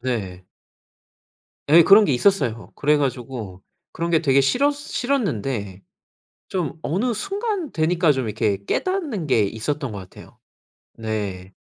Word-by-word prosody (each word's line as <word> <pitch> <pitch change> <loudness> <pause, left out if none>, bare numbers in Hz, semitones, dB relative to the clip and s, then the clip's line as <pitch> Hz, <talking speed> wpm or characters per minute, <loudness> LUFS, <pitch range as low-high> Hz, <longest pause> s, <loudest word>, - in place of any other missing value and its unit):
네. 100 -8 -4 1.2
예 165 +3 +8
그런 205 +2 +8
게 145 - +1
있었어요. 125 - +1
그래 150 +1 +2
가지고 125 -8 -4 0.3
그런 170 +1 -3
게 165 -2 +3
되게 140 -3 +4
싫어 250 - +3
싫었는데 135 - -2 0.7
좀 170 -4 -3
어느 220 +10 0
순간 400 - -3
되니까 165 0 +2
좀 130 -3 -2
이렇게 105 -2 -1
깨닫는 315 - -1
게 125 -6 +3
있었던 125 +6 -3
것 100 - -6
같아요. 95 -1 -13 0.6
네. 100 -4 -4
140 Hz, 250 characters per minute, -22 LUFS, -, 1.2 s, 예